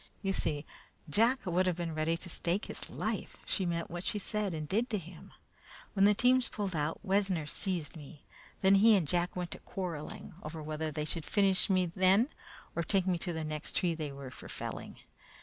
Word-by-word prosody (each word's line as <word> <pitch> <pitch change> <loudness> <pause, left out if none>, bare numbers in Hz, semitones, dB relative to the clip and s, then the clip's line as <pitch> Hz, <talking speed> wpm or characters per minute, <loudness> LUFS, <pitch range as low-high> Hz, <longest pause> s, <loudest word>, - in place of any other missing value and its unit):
You 195 0 +1
see, 150 -5 0 0.4
Jack 230 - +3
would 185 +1 +2
have 180 - +2
been 170 -1 -3
ready 155 +2 +1
to 175 - -4
stake 175 +3 0
his - - -6
life - - -3
she 190 -3 0
meant 170 -1 -2
what 175 +1 -4
she 210 - -1
said 210 0 -1
and 155 -1 -4
did 225 - +1
to 215 - +1
him. 175 -2 -10 0.6
When 195 -1 +5
the 205 0 +6
teams 250 +2 +4
pulled 200 -4 -3
out, 155 +6 -1
Wessner 190 -5 +2
seized 170 0 -1
me; 150 -1 -11 0.4
then 190 0 +6
he 215 +3 +7
and 180 -6 +2
Jack 175 +3 +1
went 180 -1 -3
to - - -6
quarreling 170 -6 -5
over 160 +1 -6
whether 155 +1 -2
they 150 0 -3
should 160 +1 -2
finish 195 +2 +3
me 185 -1 +4
then 195 +7 +5 0.5
or 170 - +1
take 185 +3 +1
me 180 -2 +1
to 175 - -2
the 160 -1 -3
next 155 -1 -4
tree 175 -2 +2
they 155 -3 -4
were 140 -2 -8
for - - -10
felling. - - -5
180 Hz, 205 wpm, -32 LUFS, 160-195 Hz, 0.6 s, he